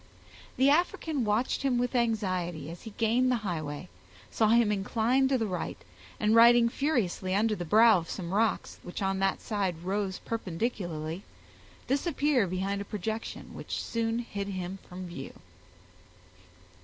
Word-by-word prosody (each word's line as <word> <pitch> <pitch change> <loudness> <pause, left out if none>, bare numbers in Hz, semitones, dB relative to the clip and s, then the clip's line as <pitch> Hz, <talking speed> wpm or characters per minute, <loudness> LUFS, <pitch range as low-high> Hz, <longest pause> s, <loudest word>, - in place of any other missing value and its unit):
The 270 +2 +5
African 315 -3 +1
watched 215 +4 +1
him 265 -3 +1
with 245 +1 0
anxiety 185 - -1
as 170 - -10
he 225 - -8
gained 240 +3 +3
the - - +3
highway, 155 -5 -4 0.4
saw 220 - +2
him 230 -1 +4
incline 225 +6 +2
to 265 0 +2
the 225 - 0
right, 185 -4 -3 0.4
and 215 0 +2
riding 235 +1 +7
furiously 220 - 0
under 215 +2 +2
the 175 -3 -5
brow 220 +2 +6
of 165 - -9
some 180 -2 -4
rocks, 220 +2 0
which 175 +3 -6
on 195 0 0
that 195 0 +1
side 190 -6 -2
rose 195 0 -1
perpendicularly, 175 -6 -3 0.6
disappear 280 - +1
behind 190 +2 -2
a - - -5
projection, 215 +3 -5
which - - -5
soon 230 0 -1
hid 200 -4 -4
him 185 -1 -4
from 185 +1 -7
view. 170 -6 -7
210 Hz, 150 wpm, -29 LUFS, 185-235 Hz, 0.6 s, riding